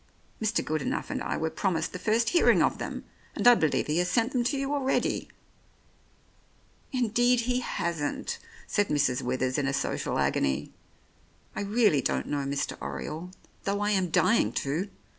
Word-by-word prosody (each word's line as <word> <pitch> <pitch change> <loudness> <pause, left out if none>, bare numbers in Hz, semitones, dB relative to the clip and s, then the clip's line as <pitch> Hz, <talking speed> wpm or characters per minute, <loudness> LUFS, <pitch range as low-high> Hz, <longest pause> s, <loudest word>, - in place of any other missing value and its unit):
Mr. 220 +1 0
Good 155 0 -1
enough - - -2
and - - -2
I - - -2
were 160 0 -1
promised 175 -5 -1
the 180 - -5
first 225 +3 +2
hearing 345 - +5
of - - +1
them, - - -5 0.3
and - - +2
I 245 - +10
believe 160 -10 +1
he 155 +3 0
has 180 0 +1
sent 230 +6 +1
them 250 -3 +1
to 280 +3 +1
you 275 +1 -1
already." 270 -2 0 1.6
"Indeed 245 0 +2
he 250 +1 0
hasn't," 170 -10 -3 0.3
said 205 -1 +1
Mrs. 140 -4 +1
Withers 130 +2 -1
in 140 - 0
a 135 - 0
social - - -1
agony. 70 +1 0 0.8
"I - - -2
really 205 - +3
don't - - -1
know 145 -1 -2
Mr. 140 +1 -2
Oriole, 160 +4 -5 0.4
though 200 +1 0
I 205 0 +1
am 190 -3 +1
dying 230 +7 +3
to. 160 +9 -2
190 Hz, 170 wpm, -28 LUFS, 150-235 Hz, 1.6 s, I